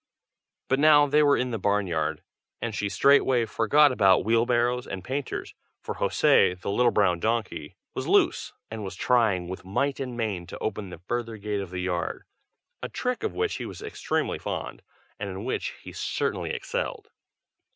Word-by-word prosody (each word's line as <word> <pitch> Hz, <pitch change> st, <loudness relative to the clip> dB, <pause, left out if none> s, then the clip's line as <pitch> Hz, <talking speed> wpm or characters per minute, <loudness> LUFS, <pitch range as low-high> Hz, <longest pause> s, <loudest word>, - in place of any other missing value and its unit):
But 135 Hz, -, +1 dB
now 150 Hz, -1 st, +7 dB
they 145 Hz, +1 st, +3 dB
were 145 Hz, -1 st, +4 dB
in 125 Hz, 0 st, -1 dB
the 115 Hz, -, -2 dB
barn 100 Hz, +1 st, +1 dB
yard, 80 Hz, -4 st, -2 dB, 0.4 s
and 115 Hz, -2 st, -3 dB
she 105 Hz, 0 st, -2 dB
straightway 130 Hz, +3 st, +4 dB
forgot 140 Hz, +7 st, +4 dB
about 95 Hz, -7 st, +4 dB
wheel 115 Hz, +2 st, +3 dB
barrows 120 Hz, +1 st, +1 dB
and 95 Hz, -2 st, -6 dB
painters, 135 Hz, +5 st, -4 dB, 0.3 s
for -, -, -5 dB
José, 90 Hz, 0 st, +3 dB
the 100 Hz, -, -3 dB
little 120 Hz, +3 st, +3 dB
brown 95 Hz, -5 st, +2 dB
donkey, 115 Hz, +1 st, -2 dB, 0.2 s
was -, -, -4 dB
loose, -, -, +2 dB, 0.2 s
and 110 Hz, -1 st, -5 dB
was 95 Hz, -, -6 dB
trying 105 Hz, -8 st, +2 dB
with 95 Hz, +1 st, -7 dB
might 135 Hz, +9 st, -1 dB
and 125 Hz, -3 st, -4 dB
main 100 Hz, -7 st, -2 dB
to -, -, -8 dB
open 105 Hz, -3 st, -4 dB
the 90 Hz, -, -8 dB
further 115 Hz, -2 st, -3 dB
gate 105 Hz, -1 st, -3 dB
of 95 Hz, -, -6 dB
the 90 Hz, 0 st, -4 dB
yard, 90 Hz, -2 st, -2 dB, 0.6 s
a -, -, -4 dB
trick 250 Hz, 0 st, -2 dB
of 435 Hz, -, -3 dB
which 440 Hz, -1 st, -1 dB
he -, -, -5 dB
was -, -, -9 dB
extremely 435 Hz, -, -2 dB
fond, -, -, -5 dB, 0.4 s
and -, -, -3 dB
in -, -, -6 dB
which -, -, -2 dB
he -, -, -8 dB
certainly -, -, -2 dB
excelled. 475 Hz, -3 st, -4 dB
115 Hz, 185 wpm, -26 LUFS, 95-135 Hz, 0.6 s, now